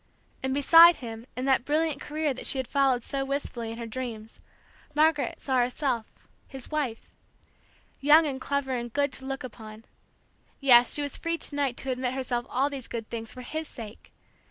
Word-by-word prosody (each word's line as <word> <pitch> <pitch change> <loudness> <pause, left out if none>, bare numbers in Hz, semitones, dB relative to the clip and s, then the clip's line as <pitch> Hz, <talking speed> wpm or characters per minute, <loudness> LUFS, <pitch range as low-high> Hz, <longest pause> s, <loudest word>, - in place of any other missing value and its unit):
And 265 - -2
beside 330 +5 +8
him 230 -2 -8
in 255 - -3
that 265 -2 +3
brilliant 300 0 0
career 300 -1 -2
that 255 - -1
she 275 - +3
had 260 -2 -2
followed 270 -4 +2
so 275 -1 -2
wistfully 270 -4 -4
in 225 - -7
her 235 - -5
dreams, 225 -2 -7 0.6
Margaret 305 -1 +2
saw 265 -2 -1
herself, 245 -2 -2 0.2
his 265 0 -10
wife. 275 -7 -3 0.9
Young 300 +3 +6
and 265 -3 -3
clever 280 -1 -2
and 240 -2 -3
good 285 +2 0
to 265 - -3
look 270 0 -4
upon, 220 -2 -10 0.7
yes, 245 -3 +6
she 290 - +1
was 285 - -2
free 335 0 -2
to 315 - -2
night 275 -4 -1
to 265 - -2
admit 255 0 -2
herself 245 -2 -2
all 265 +3 +1
these 275 -4 -6
good 225 -2 -6
things 225 -1 -4
for 255 - -9
his 315 +5 -5
sake! 220 -2 -11
265 Hz, 185 wpm, -27 LUFS, 240-285 Hz, 0.9 s, beside